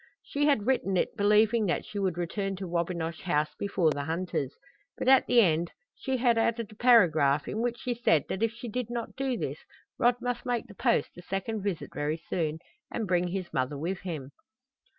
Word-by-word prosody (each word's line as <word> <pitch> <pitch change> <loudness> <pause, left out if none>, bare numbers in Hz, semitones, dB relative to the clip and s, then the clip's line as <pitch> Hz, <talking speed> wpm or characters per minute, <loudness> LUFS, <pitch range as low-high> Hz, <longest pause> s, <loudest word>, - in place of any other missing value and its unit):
She 290 +1 0
had 275 -9 +2
written 210 -7 +1
it - - 0
believing 210 +2 +3
that 175 - -1
she 205 - -5
would 185 -4 0
return 195 +3 -2
to 190 0 -6
Wabinosh 170 -1 -2
House 150 -4 0
before 185 -5 +1
the 145 -1 -3
hunters, 160 -4 -2 0.4
but - - -3
at 265 -1 +6
the 240 - +6
end 170 -3 +2 0.3
she 265 -1 -2
had 235 -2 +3
added 230 -1 0
a - - -13
paragraph 160 - +4
in 215 - -3
which 240 0 -1
she 245 - -2
said 195 - +2
that 190 - -3
if 225 -1 +2
she 235 +1 -8
did 235 +1 -3
not 240 -1 -4
do 265 -2 -1
this - - -4 0.4
Rod 240 0 +4
must 245 0 -3
make 245 -2 -1
the 220 - -13
Post - - +1
a - - -8
second 195 +4 -3
visit 195 -4 -3
very 145 +2 -1
soon, 160 -1 -2 0.3
and 225 -3 -3
bring 180 0 +2
his 185 0 -4
mother 130 +2 -1
with 175 +6 -3
him. 155 -7 -6
195 Hz, 205 wpm, -29 LUFS, 170-235 Hz, 0.4 s, at